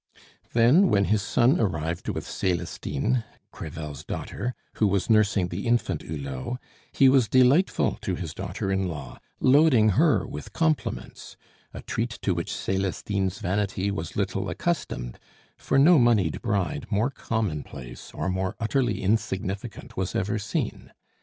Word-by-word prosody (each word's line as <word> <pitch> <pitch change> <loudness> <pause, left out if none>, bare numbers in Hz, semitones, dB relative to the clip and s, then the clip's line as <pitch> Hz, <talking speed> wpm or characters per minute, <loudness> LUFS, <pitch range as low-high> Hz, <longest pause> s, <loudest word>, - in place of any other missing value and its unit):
Then, 130 +12 +5
when 100 -1 +3
his 105 +1 +2
son 125 - +3
arrived 80 -5 -2
with - - -3
Celestine, 90 - -1 0.3
Crevel's 75 -2 -7
daughter, 125 +9 -4 0.2
who 105 - +3
was 100 +3 +1
nursing 105 -4 +3
the 95 +6 -4
infant 115 -9 +1
Hulot, 70 - -5 0.3
he 135 - +5
was 130 -3 +5
delightful 130 +8 +3
to 100 -4 -2
his 80 -3 -5
daughter 95 +2 -4
in 95 -1 +1
law, 75 -6 -7 0.2
loading 130 -5 +5
her 95 - +3
with 75 -1 -8
compliments 160 -2 -2 0.3
a - - -9
treat 115 +1 -3
to 95 - +2
which 85 -1 -3
Celestine's 95 0 -1
vanity 100 +1 -1
was 80 -4 -5
little - - -1
accustomed - - -3 0.4
for 135 - 0
no 155 +4 +7
moneyed 110 -9 +3
bride 95 -8 -1
more 110 +5 +1
commonplace 75 - -4
or - - -3
more 95 0 -1
utterly 120 -2 0
insignificant 100 0 -2
was 95 0 -2
ever 100 +3 0
seen. 100 - -3
100 Hz, 140 wpm, -26 LUFS, 90-115 Hz, 0.4 s, no